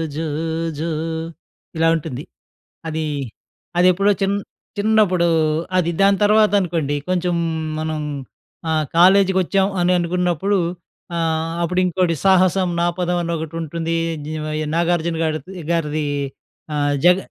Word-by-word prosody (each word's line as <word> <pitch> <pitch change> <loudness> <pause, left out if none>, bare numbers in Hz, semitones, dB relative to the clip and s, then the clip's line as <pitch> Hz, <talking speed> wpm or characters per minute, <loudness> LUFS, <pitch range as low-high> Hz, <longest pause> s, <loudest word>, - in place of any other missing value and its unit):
జో 160 +1 -2 0.5
జో 165 +2 -2 0.9
ఇలా 165 0 +3
ఉంటుంది. 150 -4 -5 0.7
అదీ 160 0 -2 0.7
అదెప్పుడో 185 +3 +4
చిన్ 195 +1 +2 0.4
చిన్నప్పుడూ 205 -5 +3 0.5
అది. 175 -2 +2
దాని 195 0 +5
తర్వాతనుకోండి, 190 -8 +2
కొంచుం 180 -1 0 0.4
మనం 155 -1 -2 0.7
ఆహ్, 155 -1 +1
కాలేజికొచ్చాం 190 +1 +4
అని 180 +1 +3
అనుకున్నప్పుడు 180 +2 0 0.6
ఆహ్, 165 -1 0
అప్పుడింకోటి 180 0 +1
'సాహసం 185 -1 +4
నాపదం' 175 +1 0
అనొకటుంటుందీ. 165 0 -3 0.3
నీవయి 155 0 -3
'నాగార్జున' 170 -1 0
గాడిద్ 155 +3 -3 0.2
గారిదీ, 155 -2 0 0.7
ఆహ్, 145 -1 +1
జగ 180 - +7
170 Hz, 95 wpm, -20 LUFS, 160-185 Hz, 0.9 s, జగ